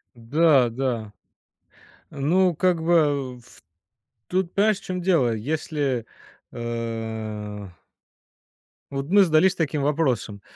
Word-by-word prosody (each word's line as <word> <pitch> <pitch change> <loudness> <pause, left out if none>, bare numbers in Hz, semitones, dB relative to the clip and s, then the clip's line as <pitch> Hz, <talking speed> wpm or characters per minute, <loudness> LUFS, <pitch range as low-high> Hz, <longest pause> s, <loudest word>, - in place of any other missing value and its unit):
Да, 135 +2 +3
да. 115 -4 -3 1.0
Ну, 175 +5 +1
как 180 0 +1
бы 145 -6 +2
в 120 0 -19 0.7
тут, 185 -1 -1
понимаешь, 210 0 +2
в - - -20
чём 180 -1 -4
дело. 165 -10 +2
Если, 140 - -2 0.5
а 110 -3 -5 1.2
вот 135 0 -3
мы 200 +3 +6
задались 180 +2 +4
таким 155 -4 -1
вопросом. 135 -9 -1
140 Hz, 100 wpm, -24 LUFS, 115-170 Hz, 1.2 s, мы